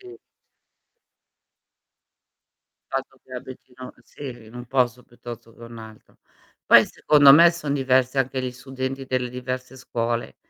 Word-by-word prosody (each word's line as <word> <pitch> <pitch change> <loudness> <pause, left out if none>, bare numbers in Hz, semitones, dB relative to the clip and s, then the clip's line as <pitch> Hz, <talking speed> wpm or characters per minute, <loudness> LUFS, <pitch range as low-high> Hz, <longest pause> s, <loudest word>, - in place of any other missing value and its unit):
Sì. 375 +1 -13 2.8
Il - - +3
fatto 135 -1 -28
che 130 - -17
abitino 125 0 -10
sì, 125 -5 -10
in 110 +2 -16
un 125 0 -9
posto 125 -1 0
piuttosto 120 -1 -12
che 115 - -17
un 115 0 -11
altro. 110 -1 -14 0.5
Poi - - +7
secondo 145 -2 +5
me 170 +4 +7
son 170 -4 -4
diversi 130 -1 +1
anche 130 0 -1
gli 125 -1 -4
studenti 130 +1 -6
delle 125 -1 -2
diverse 125 +1 -6
scuole, 120 -1 -3
130 Hz, 135 wpm, -23 LUFS, 120-135 Hz, 2.8 s, Poi